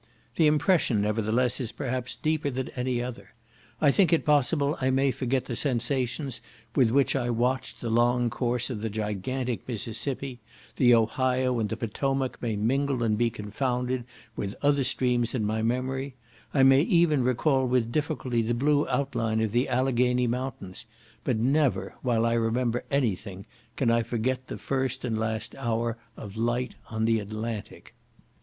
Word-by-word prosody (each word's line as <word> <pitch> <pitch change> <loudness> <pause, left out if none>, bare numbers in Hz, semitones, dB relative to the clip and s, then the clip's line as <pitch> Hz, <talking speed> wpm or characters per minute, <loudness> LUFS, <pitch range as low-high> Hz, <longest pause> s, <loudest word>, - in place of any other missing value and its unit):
The 160 - +4
impression, 150 - +3
nevertheless, 110 +4 +1
is 125 -3 -2
perhaps 130 -2 -3
deeper 155 -1 0
than 130 -1 -3
any 125 -1 -2
other; 125 -1 -7 0.5
I 145 - +5
think 180 +1 +3
it 165 - +3
possible 145 0 +2
I 130 - +2
may 135 +1 +2
forget 130 0 -1
the 120 - -4
sensations 125 +1 -1 0.3
with 125 -4 +4
which 135 +4 +2
I 120 -2 0
watched 125 +3 -1
the 115 - -3
long 120 +1 +3
course 120 0 -1
of 110 -4 -4
the 110 - -2
gigantic 110 +4 -3
Mississippi; 125 +3 -4 0.4
the 120 -2 +6
Ohio 125 +2 +1
and 110 -2 -1
the 110 - -3
Potomac 135 +4 -2
may 115 -3 -1
mingle 130 +4 0
and 110 -2 +2
be 120 +2 +2
confounded 125 +4 -2 0.3
with 100 0 -4
other 140 -1 +3
streams 125 -2 0
in 110 -4 0
my 110 +1 0
memory, 130 +3 -1 0.4
I 135 - +3
may 135 +1 +7
even 170 - +3
recall 130 +2 +2
with 120 -2 +1
difficulty 140 -5 -1
the 115 +1 0
blue 145 +4 +2
outline 115 -5 0
of 110 -2 0
the 120 +4 +1
Alleghany 125 -1 +2
mountains, 120 -6 -4 0.4
but - - 0
never, 135 +4 +1
while 115 -3 +1
I 115 - +2
remember 115 +1 0
any 130 -8 +2
thing, 95 +1 -9 0.3
can 125 -4 +2
I 115 0 +3
forget 125 +3 -2
the - - -5
first 130 -1 -2
and 115 -2 -1
last 110 0 -2
hour 115 -3 -1 0.2
of 100 0 -8
light 120 +2 0 0.2
on 110 0 -1
the 115 0 +3
Atlantic. 110 +1 -6
125 Hz, 165 wpm, -27 LUFS, 115-135 Hz, 0.5 s, may